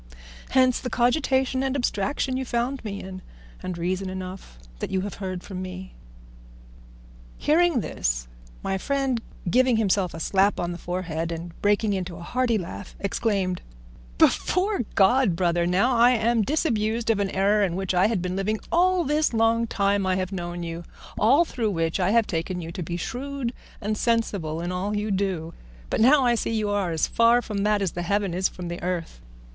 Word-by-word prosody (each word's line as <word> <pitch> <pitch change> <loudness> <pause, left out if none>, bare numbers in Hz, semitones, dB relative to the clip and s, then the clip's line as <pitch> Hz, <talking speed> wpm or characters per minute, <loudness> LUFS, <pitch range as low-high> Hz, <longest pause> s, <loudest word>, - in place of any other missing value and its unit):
Hence 255 -1 +4
the 255 - -4
cogitation 260 +1 +1
and 270 0 -1
abstraction 255 +1 -1
you 265 - -1
found 245 +2 -2
me 200 -2 -5
in, 185 0 -8 0.4
and 180 -2 -4
reason 185 +2 -2
enough, 185 - -7 0.2
what - - -3
you 190 -1 0
have 200 +1 -4
heard 185 -2 -4
from 185 -2 -6
me." 185 0 -7 1.4
Hearing 325 -3 +3
this, - - -2 0.4
my 195 0 -1
friend, 270 -1 0 0.3
giving 250 +4 +3
himself 195 -5 +1
a - - -6
slap 195 +4 +2
on 175 0 -1
the 175 - -6
forehead 170 -2 -3
and 170 +1 -5
breaking 205 +1 +2
into 180 -2 -3
a 170 - -9
hearty 245 +3 +1
laugh, 185 +1 -7
exclaimed, 200 -3 -1 0.6
"Before 390 +2 +2
God, 200 0 +4
Brother, 175 -1 +1
now 200 +8 +2
am 235 -1 +4
I - - +3
disabused 230 - +1
of 215 - 0
an 200 -1 0
error 200 +2 +2
in 180 -3 0
which 190 0 -1
I 180 +2 +4
have 215 -6 -1
been 180 0 -2
living 210 +3 -1
all 360 +1 +3
this 300 -3 +1
long 225 +1 +3
time 200 -2 +1
I 185 - +2
have 185 0 -2
known 175 -2 -4
you, 165 0 -5 0.4
all 275 +10 +5
through 235 -8 -2
which 165 -2 -1
I 180 0 +2
have 230 +1 +4
taken 175 +1 -3
you 165 -1 -6
to 185 - -6
be 170 +1 -3
shrewd 260 +4 -4 0.3
and 215 +1 -2
sensible 200 -9 0
in 175 +1 -3
all 195 +3 -2
you 210 0 -2
do; 185 -4 -1 0.4
but - - +1
now 270 +4 +6
I 240 - +4
see 235 - -1
you 210 -2 0
are 200 -3 0
as 160 -2 +1
far 235 +1 +4
from 210 -2 -4
that 210 0 +2
as 185 - 0
the 175 - -4
heaven 200 +1 0
is 185 +2 +1
from 180 -1 -7
the 170 0 -5
earth. 175 - -3
200 Hz, 190 wpm, -25 LUFS, 180-235 Hz, 1.4 s, now